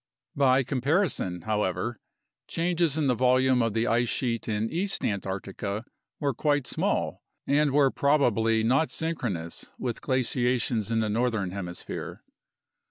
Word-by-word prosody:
By 135 -1 +4
comparison, 135 - 0
however, 105 +2 -1 0.5
changes 170 -3 0
in 155 - +1
the 130 - +3
volume 130 +1 +3
of 115 -2 0
the 115 +1 +2
ice 120 +1 +2
sheet 115 -3 -1
in 110 0 0
East 195 +4 -1
Antarctica 100 +2 -3 0.3
were 140 -2 0
quite 145 -3 +1
small - - -1 0.2
and 145 +1 +3
were 140 -1 +4
probably 115 -6 +2
not 135 +8 +3
synchronous 115 - -3
with 120 -3 -3
glaciations 125 -3 0
in 115 -1 +2
the 110 - 0
northern 110 -4 0
hemisphere. 90 -2 -6
120 Hz, 130 wpm, -27 LUFS, 110-140 Hz, 0.5 s, By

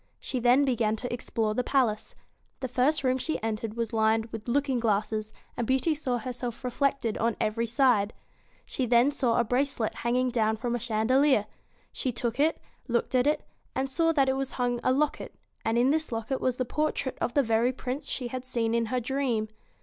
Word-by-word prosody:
She 255 - -3
then 250 +4 +4
began 230 -4 +1
to 245 +2 -5
explore 225 -2 -1
the 250 - 0
palace. 240 -6 0 0.5
The 260 - -1
first 260 +5 +2
room 255 0 +2
she 315 +5 -1
entered 220 0 -3
was 230 -1 -3
lined 220 0 +2
with 225 0 -7
looking 270 0 +1
glasses, 215 -1 0 0.2
and 235 - -2
Beauty 265 +5 +2
saw 275 -5 -1
herself 245 0 -5
reflected 250 -2 0
on 230 0 0
every 230 +2 0
side. 230 -4 +3 0.7
Then 245 +2 +4
she - - -9
saw 240 -5 +2
a - - +4
bracelet 245 -1 0
hanging 250 +2 +1
down 220 -2 +1
from 235 +2 -2
a 240 - -1
chandelier. 240 +2 +3 0.5
She 255 - -2
took 240 +1 -3
it, 310 +3 +2 0.3
looked 240 0 0
at 255 +1 +3
it, 300 - +1 0.3
and 265 +1 0
saw 330 +3 +2
that 275 -3 +3
from 265 +1 +1
it 270 - -3
hung 245 -1 0
a - - +3
locket, 290 +3 -1 0.3
and 225 +1 +1
in 250 +3 +4
this 315 -1 0
locket 230 +3 -2
was 255 -1 0
the 255 - 0
portrait 290 -1 -1
of 240 - -1
the 285 - +4
very 230 +1 +2
Prince 260 +2 -4
she 245 -2 -3
had 255 +1 -5
seen 235 -3 -1
in 230 -1 +1
her 250 +3 0
dream. 245 -3 -1
245 Hz, 200 wpm, -28 LUFS, 225-265 Hz, 0.7 s, then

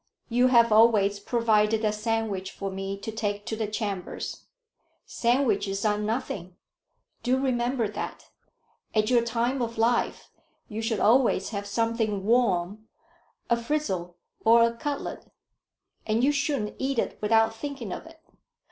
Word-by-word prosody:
"You 245 +2 +4
have 235 -2 +5
always 210 -2 +5
provided 220 -1 +2
a 210 - +3
sandwich 215 -3 -2
for 195 -1 -5
me 195 +1 -4
to 210 +3 -6
take 205 -2 -3
to 230 - -3
the 220 -1 -2
chambers." 205 -3 -4 0.6
"Sandwiches 215 -5 0
are 210 -1 +2
nothing. 210 -5 -3 0.7
Do 255 +1 +1
remember 250 -2 0
that. 210 - -6 0.7
At 215 +2 +2
your 240 -1 +5
time 235 +3 -1
of 230 -1 -3
life 235 +2 0 0.4
you 220 -2 -5
should 225 -2 -1
always 230 -4 +3
have 205 -2 -4
something 225 -1 -1
warm, 215 -3 +1 0.6
a 235 - +3
frizzle 230 - -2 0.3
or 230 +1 +6
a 230 0 +2
cutlet, 285 +4 -5 0.8
and 220 +2 +1
you 280 - +5
shouldn't 280 -7 -1
eat 270 0 -1
it - - -1
without 225 +1 +3
thinking 265 -7 -5
of - - -8
it. 325 0 -15
225 Hz, 140 wpm, -27 LUFS, 205-240 Hz, 0.8 s, or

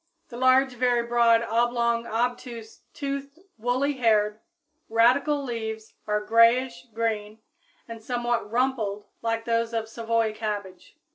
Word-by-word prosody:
_ - - -42
The 235 - -10
large, 260 +1 +4
very 245 -1 +1
broad, 235 -1 +4
oblong, 235 0 +1
obtuse, 235 -1 -3
toothed, 280 +1 -5 0.2
woolly 255 +5 0
haired, 215 -3 +2 0.5
radical 260 +6 +3
leaves 220 -3 -5
are 210 0 0
grayish 235 +3 +3
green 215 -1 -2 0.5
and 230 -1 -8
somewhat 240 -2 -1
rumpled 230 -5 -1 0.2
like 230 0 -2
those 230 0 0
of 225 -1 -2
Savoy 225 -1 -1
cabbage. 210 - -6
230 Hz, 125 wpm, -26 LUFS, 220-245 Hz, 0.5 s, large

